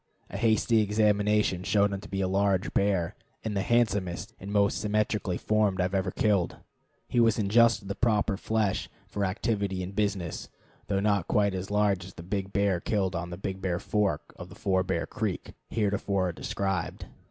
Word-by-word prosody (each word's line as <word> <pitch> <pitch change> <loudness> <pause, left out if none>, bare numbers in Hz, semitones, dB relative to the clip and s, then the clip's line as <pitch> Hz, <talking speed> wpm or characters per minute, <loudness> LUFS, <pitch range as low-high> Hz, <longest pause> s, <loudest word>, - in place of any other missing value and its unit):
A - - -4
hasty 110 0 +3
examination 105 -2 +2
showed 100 +1 +2
him 100 - -3
to 105 - -11
be 95 0 -2
a 95 - +1
large 95 0 +1
bear, 95 -4 +1 0.3
and 110 -2 -3
the 100 - +1
handsomest 100 -3 0
and 100 +2 -7
most 100 -1 +2
symmetrically 105 -3 0
formed 105 -3 +1
I - - +3
had 90 +1 -2
ever 95 -1 +1
killed. 100 -2 +1 0.5
He 120 - +1
was 115 -2 +4
in 105 -3 0
just 115 -2 +4
the 100 - -2
proper 105 -2 +1
flesh 110 -1 -1 0.2
for 100 - -3
activity 100 -1 -1
and 95 +2 -7
business, 100 -5 -2 0.4
though 100 -1 0
not 100 -3 +1
quite 100 -2 +2
as 95 0 -4
large 105 -3 +2
as 95 +1 -11
the 85 - -9
big 95 +1 -3
bear 100 -3 +1
killed 95 -1 -1
on 85 +1 -3
the 90 - -6
Big 95 0 -4
Bear 90 -2 0
Fork 100 -5 -1
of - - -9
Four 95 -1 +1
Bear 85 -3 -1
Creek, 110 -2 -4 0.2
heretofore 100 -3 0
described. 95 +1 -3
100 Hz, 185 wpm, -28 LUFS, 95-105 Hz, 0.5 s, was